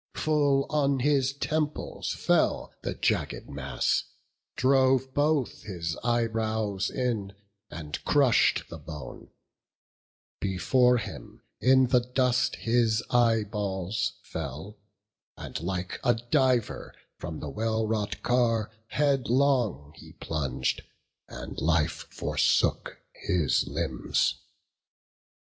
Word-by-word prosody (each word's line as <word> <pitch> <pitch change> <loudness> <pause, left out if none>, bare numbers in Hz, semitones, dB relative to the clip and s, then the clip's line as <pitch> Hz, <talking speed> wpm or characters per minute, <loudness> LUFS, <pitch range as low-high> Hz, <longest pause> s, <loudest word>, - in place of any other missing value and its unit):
Full 145 -3 +2
on 140 -3 +2
his 135 -1 +2
temples 150 +1 -2
fell - - +1
the - - -3
jagged - - -1
mass, 70 -3 -1 0.5
Drove 130 0 +3
both 145 -2 +1
his 85 -6 -4
eyebrows 110 -4 0
in, 110 -7 -2 0.3
and 75 -3 -6
crush'd 140 -5 +3
the 85 - -7
bone; 75 0 -9 1.1
Before 125 +6 +3
him 105 -4 -8 0.2
in 130 +2 +5
the 125 - +5
dust 125 0 +1
his 115 -1 +1
eyeballs 105 -4 +1
fell; 105 +1 -6 0.6
And, - - -6
like 90 +1 -3
a 120 -2 +4
diver, 120 +1 0 0.2
from 80 0 -6
the 75 - -5
well 110 +4 -1
wrought 105 -1 -2
car 115 -3 +1 0.2
Headlong 130 - +1
he - - -14
plung'd; 65 -5 -2 0.5
and - - -7
life 80 0 +1
forsook - - +1 0.2
his 85 -9 +1
limbs. - - -1
115 Hz, 100 wpm, -28 LUFS, 95-130 Hz, 1.1 s, in